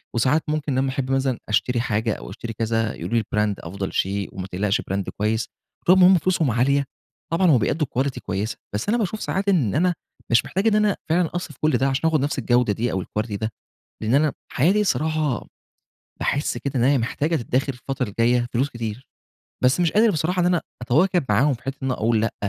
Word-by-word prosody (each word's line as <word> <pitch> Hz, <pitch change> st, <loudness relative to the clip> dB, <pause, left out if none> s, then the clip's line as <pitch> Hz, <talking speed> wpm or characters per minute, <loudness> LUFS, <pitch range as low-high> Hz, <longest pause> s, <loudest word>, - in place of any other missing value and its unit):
وساعات 130 Hz, +7 st, +2 dB
ممكن 150 Hz, -3 st, -1 dB
لمّا 135 Hz, +1 st, +1 dB
أحب 130 Hz, -1 st, -2 dB
مثلًا 135 Hz, -2 st, 0 dB
أشتري 120 Hz, +3 st, +1 dB
حاجة 110 Hz, -1 st, 0 dB
أو -, -, -8 dB
أشتري 115 Hz, -, -6 dB
كذا 115 Hz, 0 st, -1 dB
يقولوا 115 Hz, -, -2 dB
لي 110 Hz, -, +2 dB
brand 105 Hz, -1 st, +1 dB
أفضل 95 Hz, +3 st, -5 dB
شيء 100 Hz, +1 st, -1 dB
وما 95 Hz, 0 st, -5 dB
تقلقش 95 Hz, +2 st, 0 dB
brand 95 Hz, +1 st, -2 dB
كويّس، 110 Hz, +2 st, 0 dB, 0.4 s
طول 185 Hz, +2 st, +6 dB
ما 180 Hz, -, +8 dB
هُم 185 Hz, -1 st, +6 dB
فلوسهم 165 Hz, -5 st, +1 dB
عالية 140 Hz, +5 st, +2 dB, 0.5 s
طبعًا 180 Hz, +3 st, +3 dB
هو 135 Hz, -, +6 dB
بيأدوا 140 Hz, +7 st, 0 dB
quality 135 Hz, -1 st, -1 dB
كويّسة، 100 Hz, +4 st, -2 dB, 0.2 s
بس 105 Hz, -, -2 dB
أنا 235 Hz, -, +3 dB
باشوف 215 Hz, -1 st, -2 dB
ساعات 195 Hz, +1 st, -1 dB
إن 140 Hz, -, +2 dB
أنا 180 Hz, +4 st, +3 dB, 0.4 s
مش 115 Hz, 0 st, +4 dB
محتاج 195 Hz, +5 st, -1 dB
إن 215 Hz, -, +4 dB
أنا 210 Hz, -2 st, +3 dB
فعلًا 170 Hz, 0 st, +2 dB
أصرف 175 Hz, -6 st, -4 dB
كل 155 Hz, -, +3 dB
ده 135 Hz, -, +1 dB
عشان 135 Hz, +4 st, +1 dB
آخد 155 Hz, -3 st, +1 dB
نفس 140 Hz, 0 st, -1 dB
الجودة 120 Hz, -3 st, +2 dB
دي 120 Hz, +4 st, -1 dB
أو 95 Hz, -1 st, -2 dB
الquilty 105 Hz, +3 st, -4 dB
ده، 110 Hz, +2 st, -2 dB, 0.5 s
لإن 110 Hz, +3 st, +1 dB
أنا 150 Hz, +1 st, +3 dB, 0.2 s
حياتي 185 Hz, +10 st, +3 dB
الصراحة 155 Hz, -, 0 dB, 0.7 s
باحس 145 Hz, -, 0 dB
كده 140 Hz, 0 st, -4 dB
إن -, -, +2 dB
هي 140 Hz, +2 st, +4 dB
محتاجة 145 Hz, +7 st, -1 dB
تدخر 130 Hz, +1 st, -1 dB
الفترة 125 Hz, -1 st, -4 dB
الجايّة 120 Hz, +3 st, +2 dB
فلوس 130 Hz, +4 st, +1 dB
كتير، 115 Hz, 0 st, -6 dB, 0.6 s
بس 130 Hz, +7 st, +4 dB
مش 170 Hz, -2 st, +2 dB
قادر 220 Hz, +2 st, +5 dB
بصراحة 175 Hz, +2 st, 0 dB
إن -, -, +2 dB
أنا 180 Hz, -2 st, +2 dB, 0.2 s
أتواكب 165 Hz, +8 st, +2 dB
معاهم 130 Hz, +8 st, +3 dB
في 120 Hz, -, -12 dB
حتة 135 Hz, +1 st, -4 dB
إن -, -, -1 dB
أنا -, -, +1 dB
أقول 110 Hz, -1 st, +1 dB
لأ، 115 Hz, -, -1 dB
130 Hz, 210 wpm, -23 LUFS, 115-160 Hz, 0.7 s, ما